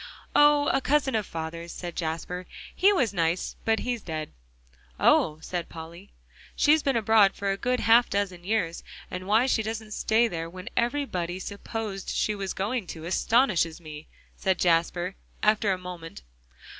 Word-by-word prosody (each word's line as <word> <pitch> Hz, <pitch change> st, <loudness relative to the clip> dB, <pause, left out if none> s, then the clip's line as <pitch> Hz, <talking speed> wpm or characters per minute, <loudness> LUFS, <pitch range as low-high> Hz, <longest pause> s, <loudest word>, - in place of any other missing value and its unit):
"Oh! 295 Hz, 0 st, +6 dB
a 270 Hz, -, +2 dB
cousin 280 Hz, -1 st, +2 dB
of 215 Hz, -3 st, 0 dB
father's," 165 Hz, +1 st, -6 dB
said 175 Hz, -2 st, -7 dB
Jasper. 175 Hz, +2 st, -4 dB, 0.3 s
"He 390 Hz, +3 st, +5 dB
was 250 Hz, -, +1 dB
nice, 170 Hz, 0 st, 0 dB
but 225 Hz, 0 st, +2 dB
he's 245 Hz, -2 st, -2 dB
dead." 155 Hz, -3 st, -5 dB, 0.7 s
"Oh!" 155 Hz, -, +4 dB
said 175 Hz, -2 st, -4 dB
Polly. 170 Hz, +4 st, -10 dB, 0.5 s
"She's 305 Hz, +1 st, +4 dB
been 275 Hz, -3 st, 0 dB
abroad 220 Hz, -3 st, +4 dB
for 200 Hz, -1 st, -1 dB
a -, -, 0 dB
good 250 Hz, +5 st, -1 dB
half 230 Hz, +3 st, +5 dB
dozen 190 Hz, -3 st, -2 dB
years, 180 Hz, -4 st, -1 dB, 0.3 s
and 185 Hz, +1 st, -5 dB
why 220 Hz, +4 st, +4 dB
she 255 Hz, -4 st, +2 dB
doesn't 220 Hz, 0 st, -5 dB
stay 220 Hz, +2 st, +2 dB
there 165 Hz, -5 st, -4 dB
when 185 Hz, +2 st, -8 dB
everybody 235 Hz, -9 st, -1 dB
supposed 200 Hz, +1 st, -5 dB
she 215 Hz, -, 0 dB
was 195 Hz, -2 st, -4 dB
going 205 Hz, +1 st, -2 dB
to, 160 Hz, -1 st, -8 dB
astonishes 185 Hz, -3 st, +2 dB
me," 155 Hz, -2 st, -10 dB, 0.3 s
said 190 Hz, -2 st, 0 dB
Jasper, 175 Hz, +1 st, +1 dB, 0.3 s
after 210 Hz, -1 st, +3 dB
a 185 Hz, -, 0 dB
moment. 175 Hz, -, -9 dB
195 Hz, 160 wpm, -27 LUFS, 170-225 Hz, 0.7 s, Oh